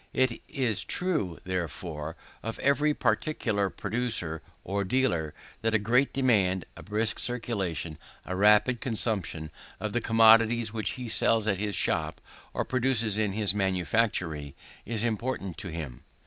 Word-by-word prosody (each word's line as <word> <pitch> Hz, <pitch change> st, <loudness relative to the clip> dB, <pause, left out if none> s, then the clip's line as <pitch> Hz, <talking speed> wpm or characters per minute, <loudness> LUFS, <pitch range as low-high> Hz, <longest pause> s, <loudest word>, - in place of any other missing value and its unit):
It 130 Hz, -3 st, +1 dB
is 125 Hz, -6 st, 0 dB
true, 155 Hz, -, -1 dB
therefore, 85 Hz, -3 st, -4 dB, 0.3 s
of 115 Hz, +1 st, -5 dB
every 140 Hz, +2 st, +2 dB
particular 110 Hz, -5 st, 0 dB
producer 110 Hz, -9 st, -2 dB, 0.2 s
or 100 Hz, +2 st, -2 dB
dealer, 95 Hz, -, 0 dB, 0.3 s
that 115 Hz, 0 st, +1 dB
a -, -, +7 dB
great 120 Hz, +6 st, +2 dB
demand, 100 Hz, -9 st, +2 dB
a -, -, -10 dB
brisk 105 Hz, +1 st, -1 dB
circulation, 95 Hz, -10 st, -2 dB, 0.3 s
a 95 Hz, -, -4 dB
rapid 105 Hz, +5 st, +4 dB
consumption, 100 Hz, -, 0 dB, 0.3 s
of 110 Hz, -1 st, -4 dB
the 120 Hz, -, 0 dB
commodities 115 Hz, 0 st, +5 dB
which 110 Hz, -2 st, -1 dB
he 125 Hz, -2 st, -6 dB
sells 115 Hz, 0 st, +4 dB
at 100 Hz, -4 st, 0 dB
his 105 Hz, -1 st, -1 dB
shop -, -, 0 dB, 0.3 s
or -, -, -2 dB
produces 120 Hz, -5 st, +1 dB
in 105 Hz, -3 st, 0 dB
his 105 Hz, -2 st, +4 dB
manufactory, 90 Hz, -6 st, -1 dB, 0.3 s
is 115 Hz, -2 st, 0 dB
important 110 Hz, -5 st, -2 dB
to -, -, -6 dB
him. 80 Hz, -7 st, -7 dB
105 Hz, 140 wpm, -28 LUFS, 95-120 Hz, 0.3 s, a